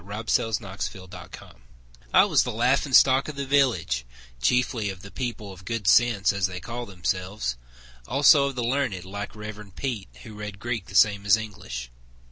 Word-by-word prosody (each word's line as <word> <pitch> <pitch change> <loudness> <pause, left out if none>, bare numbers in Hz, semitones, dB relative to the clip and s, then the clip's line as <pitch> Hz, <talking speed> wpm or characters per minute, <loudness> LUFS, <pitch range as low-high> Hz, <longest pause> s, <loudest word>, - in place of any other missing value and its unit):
Tennessee 110 +5 0 0.2
Claflin 95 -3 -7
Shope - - -13 0.5
I - - +6
was - - +3
the - - -2
laughing 130 +5 +1
stock 130 +1 +6
of 150 - -6
the 140 0 -3
village, 115 - +1 0.4
Chiefly 115 - +1
of 95 +1 -8
the 100 - -11
people 115 -6 -5
of 95 0 -14
good 115 +1 -4
sense, 115 -5 +4
as 100 -2 +1
they 90 0 -6
call 120 +4 -6
themselves— 90 - -3 0.5
Also 140 +1 +5
of 135 - -5
the 125 - -2
learned, 120 -7 -1
like 100 +2 -6
Rev. 105 -2 -9
Peet, 125 -7 -4 0.2
who 110 - -10
read 105 -1 -7
Greek 115 -3 -4
The 95 - -10
same 100 -1 +4
as 100 +1 +6
English. 65 - -7
105 Hz, 175 wpm, -25 LUFS, 95-120 Hz, 0.5 s, I